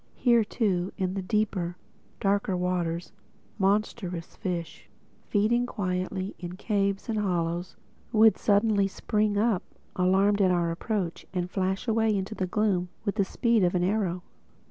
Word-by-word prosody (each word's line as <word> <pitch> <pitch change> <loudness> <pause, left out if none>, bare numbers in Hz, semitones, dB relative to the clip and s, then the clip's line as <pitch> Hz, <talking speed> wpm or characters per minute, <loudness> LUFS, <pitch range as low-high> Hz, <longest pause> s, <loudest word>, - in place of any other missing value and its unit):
Here 235 -3 +4
too, 195 -4 0
in 185 -2 -1
the 195 - -2
deeper, 185 -3 -1 0.4
darker 200 -1 +1
waters, 180 -1 -1 0.5
monstrous 195 -3 -1
fishes, 175 -5 -5 0.4
feeding 235 +4 +2
quietly 185 -2 -2
in 175 0 -6
caves 200 -1 -1
and 220 -2 -1
hollows 175 -2 -1 0.4
would 220 -1 +6
suddenly 205 -1 +3
spring 210 +1 0
up, 215 -3 +2 0.3
alarmed 195 +3 +3
at 190 - +5
our 170 -2 +1
approach, 180 -1 -3
and 180 0 -2
flash 190 +4 -1
away 220 -2 +2
into 195 +3 -3
the 185 -3 -2
gloom 185 -2 +1 0.2
with 200 - 0
the 205 - +2
speed 230 +2 +1
of 180 0 +2
an 175 - +2
arrow. 185 -2 0
195 Hz, 145 wpm, -27 LUFS, 180-210 Hz, 0.5 s, would